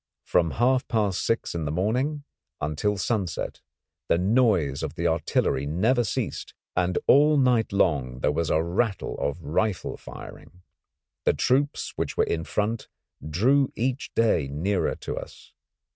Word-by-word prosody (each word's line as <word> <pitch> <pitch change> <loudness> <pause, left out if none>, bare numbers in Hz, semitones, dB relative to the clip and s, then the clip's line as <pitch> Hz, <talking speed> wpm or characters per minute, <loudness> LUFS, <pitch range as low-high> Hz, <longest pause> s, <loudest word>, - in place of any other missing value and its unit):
From 85 -2 +2
half 125 +2 +2
past 105 -5 0
six 115 - 0
in 85 -2 -3
the 75 - -2
morning 125 - 0 0.4
until 75 +8 -1
sunset 95 -3 -2 0.5
the - - +4
noise 95 - +2
of - - -4
the 85 -1 -3
artillery 80 -4 +1
never 110 - +2
ceased, - - -3 0.2
and 90 0 +1
all 150 +2 +6
night 125 -4 +3
long 65 -10 +1
there - - +2
was 80 +1 -1
a 80 - +2
rattle 95 +5 -1
of 70 +4 -2
rifle 90 +6 -1
firing. 90 0 -12 0.6
The - - +4
troops 140 +3 0
which - - -3
were - - +4
in 80 -1 -2
front 110 +2 -2 0.4
drew 130 - +3
each 130 +3 -2
day 105 -11 +2
nearer 85 +8 -1
to - - -6
us. - - -10
95 Hz, 145 wpm, -26 LUFS, 80-120 Hz, 0.6 s, all